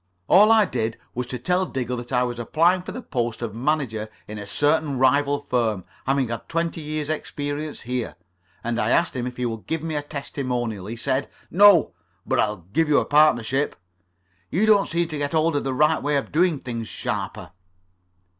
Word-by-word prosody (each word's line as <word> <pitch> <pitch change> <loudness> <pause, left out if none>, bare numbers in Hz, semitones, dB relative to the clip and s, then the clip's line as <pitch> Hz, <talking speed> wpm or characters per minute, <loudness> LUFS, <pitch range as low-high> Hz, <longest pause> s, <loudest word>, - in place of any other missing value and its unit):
All 210 +4 +7
I 220 -2 +6
did 110 -9 -2 0.2
was 125 0 -3
to 125 - -4
tell 180 +9 0
Diggle 125 -2 -3
that 120 +1 -8
I 125 -1 +2
was 120 -1 -3
applying 170 +9 +2
for 180 - -7
the 250 - -7
post 120 -3 -2
of 110 -3 -4
manager 120 -4 -1 0.2
in 105 0 -7
a 105 - -7
certain 145 +5 +1
rival 140 +2 +3
firm, 110 -7 0 0.2
having 135 -2 +1
had 115 -1 -6
twenty 165 0 -1
years' 150 -1 -3
experience 150 -1 -4
here. 125 0 -3 0.5
And 120 0 -1
I - - +1
asked 170 -3 +2
him 125 -1 -2
if 125 - -7
he 125 - -1
would 115 -2 -5
give 160 -1 -2
me 165 -1 -3
a 150 - 0
testimonial. 125 -8 -4
He 115 - -5
said: 130 +3 -1 0.2
'No, 200 -2 +6 0.3
but - - 0
I - - +4
will 100 -5 -8
give 160 0 +2
you 150 - +5
a - - +2
partnership.' 145 -3 +3 0.7
You 195 +6 +2
don't 210 -2 +4
seem 170 0 0
to 155 -2 -5
get 145 +1 -2
hold 160 0 +2
of 145 - 0
the 135 - -1
right 150 +3 +3
way 145 +1 +1
of 140 - -3
doing 170 +1 +3
things, 115 -4 -5
Sharper." - - -4
140 Hz, 200 wpm, -23 LUFS, 120-155 Hz, 0.7 s, All